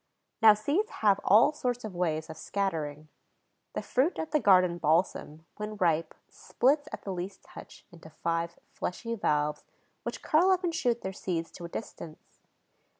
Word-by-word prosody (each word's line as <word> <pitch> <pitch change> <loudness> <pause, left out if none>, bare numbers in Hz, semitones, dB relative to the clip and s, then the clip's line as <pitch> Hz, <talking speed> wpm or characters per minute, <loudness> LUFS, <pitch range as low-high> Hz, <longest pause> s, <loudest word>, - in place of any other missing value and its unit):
Now 220 -2 +8
seeds 295 - 0 0.2
have 200 -1 +5
all 225 +9 +6
sorts 245 -4 -2
of 215 -3 -6
ways 160 -3 -1
of 160 - -8
scattering. 155 -7 -3 0.6
The - - -3
fruit 275 +8 +1
of 320 - -4
the 305 - +3
garden 180 -6 +4
balsam, 160 -1 0
when 210 0 -5
ripe, 165 -5 +1
splits, 290 +4 0
at - - -7
the 195 - -4
least 185 +2 -6
touch, - - -13
into 165 -2 -13
five 165 +2 -2
fleshy 230 +6 -4
valves, 150 -8 0 0.4
which - - -6
curl 335 +5 +4
up 370 -1 +3
and 345 -2 0
shoot 240 -7 0
their 190 - -4
seeds 170 -3 -3
to 175 - -9
a - - -7
distance. 170 -5 -7
190 Hz, 165 wpm, -29 LUFS, 165-240 Hz, 0.6 s, Now